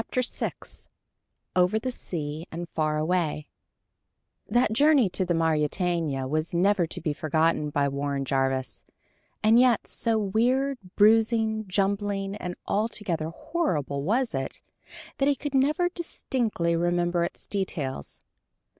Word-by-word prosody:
_" 255 -1 0
VI - - -10 0.7
OVER 180 +4 +3
THE 255 +4 -2
SEA 155 -7 -5
AND 170 +1 -5
FAR 155 -1 0
AWAY 155 -2 0 1.0
That 240 -2 +2
journey 280 -3 +5
to 185 - +1
the 175 -1 0
Mauretania 160 -2 0
was 155 +4 -2
never 185 0 +3
to - - -5
be 155 -2 -1
forgotten 155 0 +1
by 145 -1 +1
Warren 140 0 -2
Jarvis; 135 -1 -1 0.6
and 220 +2 +6
yet 245 -3 +4
so 230 -1 0
weird, 245 +6 +1 0.2
bruising, 220 0 +3
jumbling, 195 +1 -1
and 180 -3 -5
altogether 200 -7 -1
horrible 165 - -2
was 230 - 0
it, - - -3 0.6
that 275 - +3
he 285 - +3
could 285 +2 -5
never 295 +6 +3
distinctly 240 - -1
remember 175 0 +1
its 170 - -5
details. 150 - -4
180 Hz, 130 wpm, -26 LUFS, 155-225 Hz, 1.0 s, and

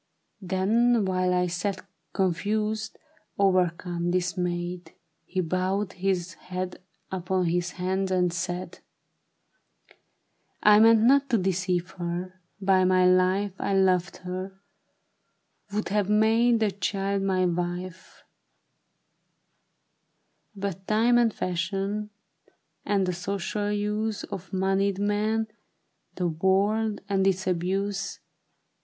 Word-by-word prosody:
" - - -49
Then 210 +5 +2
while 185 -1 +1
I 180 0 +2
sat 180 +3 -3 0.3
confused, 210 +4 -1 0.4
o'ercome, 180 -2 +1
dismayed, 180 0 -2 0.3
He 185 0 -2
bowed 185 +3 -1
his 185 -2 -1
head 180 0 -6 0.3
upon 185 0 -1
his 175 +1 -1
hands, 190 +1 -1
and 180 -2 +1
said, 175 +1 -4 1.3
" - - -31
I 210 0 +7
meant 225 0 +6
not 275 +3 +4
to 235 - +3
deceive 180 -1 -1
her; 180 +2 -4 0.2
by 190 -1 +3
my 185 0 +4
life 185 +2 +3
I 195 - 0
loved 185 -2 +2
her, 185 +1 -5 1.1
would 210 +1 -2
have 205 0 0
made 225 +2 +3
the 215 -2 +2
child 195 +1 -1
my 190 -1 +1
wife; 175 +1 -4 2.3
But 195 -1 -5
time 235 +3 +4
and 235 -2 +3
fashion, 195 +4 -2 0.7
and 200 -2 +1
the 180 - -1
social 200 +3 -3
use 210 +1 -1
Of 185 -2 -7
moneyed 195 +1 +1
men, 210 +2 0 0.7
the 180 - 0
world 200 +6 +1
and 195 -1 +2
its 190 0 +1
abuse. 195 +2 -1
190 Hz, 110 wpm, -26 LUFS, 180-205 Hz, 2.3 s, I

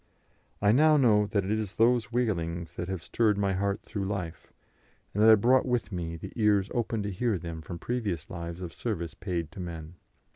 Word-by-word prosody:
I 100 - +6
now 155 +5 +5
know 105 -6 +4
that 100 -1 0
it 100 - -2
is 110 -3 -2
those 120 0 +3
wailings 85 -8 -1
that 85 - -5
have 95 -3 -4
stirred 110 -3 +1
my 100 -1 +1
heart 100 +1 -1
through 100 -2 -4
life, 95 -5 -5 0.6
and 105 - 0
that 110 - +7
I 110 - +10
brought 125 +6 +3
with 125 -3 0
me 85 -3 -4
the 80 - -8
ears 105 -3 +3
open 115 -3 -1
to 100 - -3
hear 110 +2 0
them 85 -1 -6
from 85 +2 -7
previous 105 -8 -3
lives 85 +1 -6
of 85 -2 -6
service 85 -9 -3
paid 85 -5 -4
to 95 - -11
men. 85 -2 -6
100 Hz, 205 wpm, -28 LUFS, 85-110 Hz, 0.6 s, I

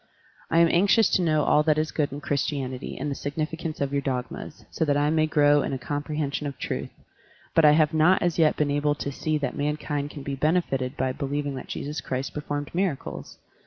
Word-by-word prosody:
I 165 - +1
am 170 - +6
anxious 200 +6 +4
to - - +3
know 155 -3 +2
all 150 - +4
that 155 -1 +2
is 155 0 0
good 150 -2 0
in 145 +2 -6
Christianity 140 -2 -2
and 145 +1 -3
the - - 0
significance 155 +3 -4
of 140 0 -1
your 140 - +1
dogmas, 130 +2 -5
so - - -1
that 145 -2 +2
I 145 +1 +2
may 155 -1 +2
grow 145 -1 +4
in - - -2
a - - -1
compre 145 +3 -4
hension 145 0 -2
of 140 - -6
truth, - - -4 0.6
but 165 - +5
I 150 - +8
have 155 0 +3
not 160 +4 +4
as 175 -1 0
yet 155 -2 +4
been 145 -1 +1
able 145 +1 +1
to 140 - -4
see 155 +3 -1
that 145 -4 -3
mankind 145 0 -2
can 145 -2 -9
be 140 - -4
benefited 135 -4 0
by 130 0 0
believing 145 +1 -3
that 130 - -7
Jesus 150 +2 -4
Christ 130 +1 -3
performed 145 -1 -4
miracles. 175 -5 -3
145 Hz, 220 wpm, -26 LUFS, 140-155 Hz, 0.6 s, I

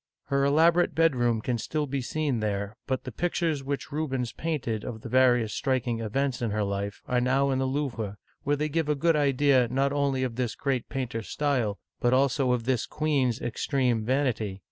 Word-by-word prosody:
Her 140 0 +2
elaborate 165 +5 +4
bedroom 120 -9 +2
can 120 +1 -1
still 150 +5 -2
be 140 -1 -2
seen 140 -1 -1
there, 100 0 -2
but 130 -1 -1
the 130 - -6
pictures 165 0 -1
which 140 +1 -4
Rubens 135 -5 -2
painted 125 -10 -3
of 115 -4 -6
the - - -7
various 125 -4 +3
striking 130 -4 0
events 125 +4 -1
in 120 - 0
her 105 0 0
life 100 0 -3
are 125 -1 +1
now 135 +2 +2
in 130 - 0
the 130 - +1
Louvre, 120 -7 -3 0.2
where 145 +1 +1
they 150 +1 -1
give 155 0 -1
a 150 - +3
good 165 +3 +2
idea 140 -3 +3
not 135 +2 +1
only 140 -2 +1
of 125 -2 -3
this 125 -4 -1
great 135 -4 -2
painter's 120 -5 -4
style, 130 -9 0 0.2
but 120 +1 +2
also 135 -1 +2
of 125 -2 0
this 125 -1 0
queen's 140 -7 0
extreme 120 -1 0
vanity. 115 -6 0
130 Hz, 190 wpm, -27 LUFS, 120-145 Hz, 0.2 s, elaborate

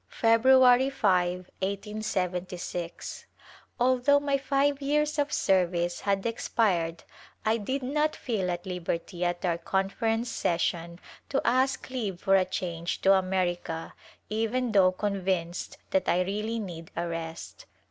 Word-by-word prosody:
February 250 +3 +5
5, 180 -6 +1
l8y6. 185 -4 -3 0.5
Although 255 +3 +4
my 285 -1 0
five 280 +1 +1
years 300 +2 +1
of 290 0 +1
service 175 -5 +1
had 195 -1 0
expired 180 -7 0 0.4
I 220 +1 +3
did 260 +5 -3
not 300 +4 0
feel 205 -7 -2
at 175 +1 -3
liberty 180 0 -3
at 175 +1 -1
our 170 -1 0
Conference 225 +6 0
session 170 -3 -1 0.3
to 275 - +1
ask 260 +1 +2
leave 210 -9 -3
for 195 0 +3
a 190 -1 +4
change 170 -2 -3
to 195 - +6
America 180 -3 -1 0.3
even 225 +3 -1
though 190 -3 +5
convinced 185 -3 -2
that 190 -1 +1
I 180 - +3
really 210 +4 -2
need 175 -6 -6
a 170 +1 -2
rest. 165 -1 -6
195 Hz, 125 wpm, -28 LUFS, 175-245 Hz, 0.5 s, to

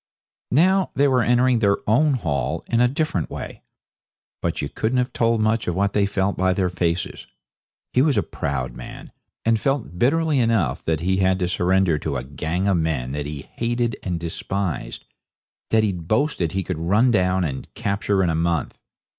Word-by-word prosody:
Now 185 +7 +3
they 140 +1 +4
were 130 -2 +3
entering 125 +1 +3
their 100 -2 +3
own 140 +7 +3
hall 75 - -2
in 115 0 +1
a 125 - +5
different 135 - -1
way. - - -7 0.8
But - - -2
you - - -2
couldn't 115 +4 -1
have 125 0 0
told 115 -1 +2
much 110 0 +1
of 90 - -1
what 100 +1 +1
they 100 -1 +2
felt 100 -1 0
by 95 0 +2
their 90 -1 0
faces. 85 -1 -2 0.7
He 125 - +4
was 145 -1 +2
a - - +3
proud 65 -3 -3
man, 60 - -10 0.3
and 115 -1 +3
felt 135 -9 -2
bitterly 155 - +2
enough 115 - +1
that 80 -2 0
he 95 +2 +1
had 95 -1 +2
to 90 -2 -1
surrender 90 -2 +2
to 70 -3 -2
a 60 - -4
gang 80 +7 -2
of 95 -3 +3
men 75 -7 -1
that 75 +1 -3
he 75 -2 -6
hated 120 0 0
and 90 -3 -3
despised, 90 +2 -4 0.6
that 110 -1 +3
he'd 90 -6 -2
boasted 110 - 0
he 95 0 -1
could 90 -4 -4
run 105 +9 +3
down 95 -3 +2
and 70 -5 -4
capture 100 -1 0
in 85 - +2
a - - -1
month. 85 -1 -1
95 Hz, 190 wpm, -22 LUFS, 85-120 Hz, 0.8 s, a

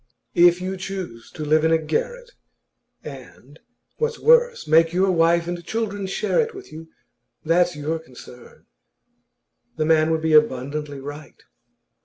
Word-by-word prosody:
If 175 +1 +4
you 190 +1 -4
choose 185 -11 -7
to 155 - -6
live 155 +1 +2
in 160 - +2
a 165 - +5
garret, 485 - -4 0.7
and, - - -12 0.4
what's 465 0 -2
worse, 485 0 +3
make 165 +2 +4
your 190 +1 +2
wife 170 0 +2
and 175 0 -5
children 205 -1 -3
share 195 - -1
it 460 -1 -4
with 390 - -11
you, 160 +1 -10 0.6
that's 175 +1 +2
your 155 +2 -3
concern." 125 -4 -15 1.1
The 155 - 0
man 155 0 +3
would 160 -1 -1
be 160 -1 +1
abundantly 145 0 +1
right. 145 +2 -10
165 Hz, 145 wpm, -22 LUFS, 155-190 Hz, 1.1 s, a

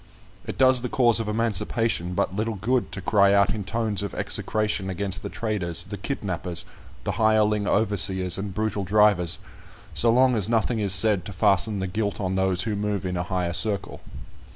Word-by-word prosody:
It - - -5
does 130 -1 +5
the 125 - -4
cause 120 -3 +3
of 115 - -3
emancipation 110 -4 -1
but 95 - -1
little 110 +2 -2
good 120 +6 -1
to 95 - -5
cry 100 +1 +3
out 100 0 +3
in 105 -2 -4
tones 110 0 -1
of 100 - -5
execration 105 -3 -1
against 100 +2 -3
the - - -6
traders, 105 -7 -3
the 100 +2 -7
kidnappers, 90 -6 -4 0.4
the - - -2
hireling 105 -1 +2
overseers, 95 -4 +2
and 100 0 -4
brutal 105 0 -2
drivers, 100 -3 +3 0.6
so 115 - +3
long 125 +1 +4
as 105 -1 0
nothing 115 0 +1
is 100 -2 0
said 105 -3 +2
to 100 - -7
fasten 95 +3 +2
the 95 - -2
guilt 100 +2 -3
on 95 -2 -2
those 95 0 0
who 110 -2 -2
move 100 -2 -2
in 90 0 -2
a 90 - -1
higher 90 -2 -1
circle. 100 +1 0
105 Hz, 185 wpm, -24 LUFS, 95-110 Hz, 0.6 s, does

